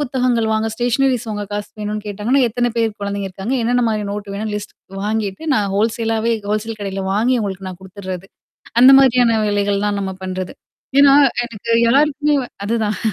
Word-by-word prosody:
புத்தகங்கள் 250 -4 0
வாங்க, 220 +1 0
ஸ்டேஷனரீஸ் 245 +1 +1
வாங்க 205 -1 -3
காசு 205 0 -4
வேணும்னு 210 0 -3
கேட்டாங்கன்னா, 210 +7 0
எத்தனை 245 +2 0
பேர் 225 -1 +2
குழந்தைங்க 200 -1 -3
இருக்காங்க. 195 +7 -4
என்னென்ன 245 +1 +2
மாரி 215 -1 -1
நோட்டு 205 -1 -5
வேணும் 215 +2 -3
லிஸ்ட் 205 0 -6 0.3
வாங்கிட்டு 210 +2 -2
நான் 205 -4 0
ஹோல்சேலாவே 225 +1 0 0.2
ஹோல்சேல் 215 +1 -2
கடையில 195 -1 -4
வாங்கி 235 +5 +2
அவுங்களுக்கு 195 -3 -4
நான் 185 -1 -8
குடுத்துர்றது. 190 -1 -7 0.5
அந்த 260 +2 +9
மாதிரியான 245 -4 +4
வேலைகள் 205 0 0
தான் 205 -1 -1
நம்ம 190 -1 -3
பண்றது. 185 0 -4 0.5
ஏன்னா 280 -1 +7 0.3
எனக்கு 230 -1 -7 0.2
எல்லாருக்குமே 295 +2 +2 0.3
அதுதான் 215 -2 -1
215 Hz, 160 wpm, -19 LUFS, 200-240 Hz, 0.5 s, அந்த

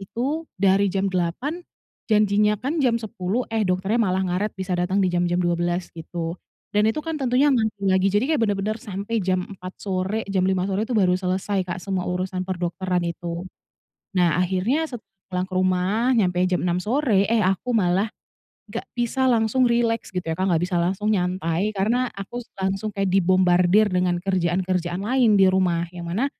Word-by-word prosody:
Itu 275 - -3
dari 195 +1 +3
jam 195 0 -1
08.00, 215 - -2 0.5
janjinya 210 0 +3
kan 290 +8 -2
jam 245 -4 +3
10.00, 220 +1 -3
eh, 225 - +1
dokternya 190 +6 +1
malah 190 -3 +1
ngaret, 185 +4 -2
bisa 190 0 -4
datang 185 +2 +1
di 180 - 0
jam-jam 175 0 +1
12.00 175 0 -1
gitu. 165 0 -5 0.4
Dan 210 +1 +3
itu 300 +7 -2
kan 320 -3 -3
tentunya 265 +3 +3
ngantri 220 -4 0
lagi. 190 +1 +3
Jadi 205 +5 +2
kayak 295 - +1
benar-benar 205 +2 -1
sampai 205 0 -3
jam 185 -1 0
04.00 185 -3 -10
sore, 195 +3 -2
jam 190 -1 +2
05.00 185 -1 +1
sore 200 +4 -1
itu 245 - 0
baru 185 -4 +4
selesai, 185 +2 -1
Kak, - - -2
semua 190 -2 -2
urusan 185 +1 -2
perdokteran 180 0 -1
itu. 170 +1 -4 0.7
Nah, 175 -3 +2
akhirnya 190 - +1
set 245 -7 -8 0.2
pulang 185 0 -3
ke - - -9
rumah, 185 +7 +2
nyampe 180 -5 +2
jam 180 -1 0
06.00 175 0 0
sore, 215 0 +1
eh, 225 +1 +2
aku 195 +6 0
malah 190 -1 +2 0.6
enggak - - -5
bisa 260 +2 +1
langsung 235 +2 +3
rileks 235 -1 +1
gitu 180 - -3
ya, 160 - -1
Kak, 190 - 0
enggak 165 +1 +1
bisa 175 - 0
langsung 195 +5 0
nyantai, 180 0 0
karena 235 +6 +1
aku 200 +5 -6
terus - - -17
langsung 195 +2 -1
kayak 195 -1 0
dibombardir 185 +2 +4
dengan 180 -1 +1
kerjaan-kerjaan 180 -1 -1
lain 240 -4 +3
di 195 - +6
rumah, 180 -3 +1
yang 170 -1 -6
mana 215 +10 0
190 Hz, 180 wpm, -23 LUFS, 180-220 Hz, 0.7 s, di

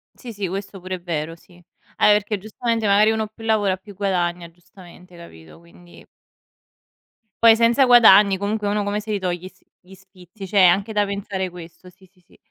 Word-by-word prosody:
Sì, 240 -3 -10
sì, 200 -3 -5
questo 195 0 -7
pure 185 +1 -6
è - - -15
vero, 165 -2 -5
sì. 175 +1 -22 0.3
Ah, - - +3
e 210 - +6
perché, 210 +1 0
giustamente, 225 +2 -3
magari, 205 +2 +4
uno 220 -1 -3
più 225 +1 -15
lavora 210 -4 0
più 200 +2 -15
guadagna, 175 -3 -3
giustamente 175 +1 -18
capito? 80 - -15
Quindi 170 +1 -19 1.4
Poi 225 -1 +7
senza 235 +3 +3
guadagni 210 -5 +6
comunque 205 +1 -3
uno 205 0 -1
come 205 +1 -3
se 215 0 -6
li 205 - -1
toglie 180 -1 -4
i - - -7
s 190 - -29 0.2
gli 190 +1 -17
sfizi? 190 +1 -15
C'è 195 +1 +2
anche 195 +4 +3
da 210 -1 0
pensare 200 -1 -5
questo 175 0 -13
sì, 185 +1 -21
sì, 185 0 -27
sì. 175 - -26
195 Hz, 195 wpm, -21 LUFS, 180-210 Hz, 1.4 s, Poi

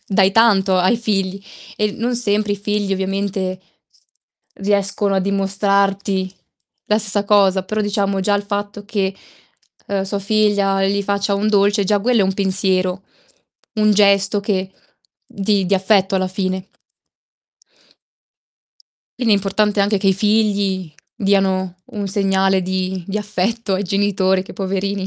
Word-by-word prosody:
dai 195 -1 +3
tanto 195 -4 +4
ai 185 +6 +3
figli, 195 -4 -2 0.4
e 210 -1 0
l - - -10
non 240 +1 -1
sempre 210 -3 0
i 205 - -2
figli 205 0 -2
ovviamente 190 -1 -2 1.0
riescono 200 0 0
a 190 - +2
dimostrarti 195 0 0 0.5
la 210 - +2
stessa 205 -1 -1
cosa. 195 -2 +3
Però, 215 +3 -3
diciamo, 200 -1 -1
già 205 +2 +1
il 205 - 0
fatto 205 0 -5
che, 195 -2 -2 0.7
uhm, 200 -1 -1
sua 195 +1 -3
figlia 200 -1 +1
gli 200 +1 0
faccia 200 0 0
un 200 +2 -1
dolce, 205 0 +2
già 205 +1 +1
quello 240 +1 +2
è - - +3
un 190 0 -1
pensiero, 190 -1 0 0.7
un 215 -1 +3
gesto 200 0 +3
che 190 -2 -2 0.5
di 200 -1 0
di 195 - +2
affetto, 195 0 +2
alla 185 0 0
fine. 185 0 -3 2.5
Quindi 230 -4 +3
è - - +4
importante 205 +1 0
anche 200 +1 +2
che 195 - -2
i 190 - +3
figli 200 -4 0 0.2
diano 190 -2 0 0.2
un 205 -3 -4
segnale 195 -1 +1
di 185 -1 -3
di 205 +2 -2
affetto 210 +1 -2
ai 190 - -1
genitori 190 -1 +1
che 190 - -12
poverini 195 0 -2
200 Hz, 145 wpm, -19 LUFS, 190-205 Hz, 2.5 s, tanto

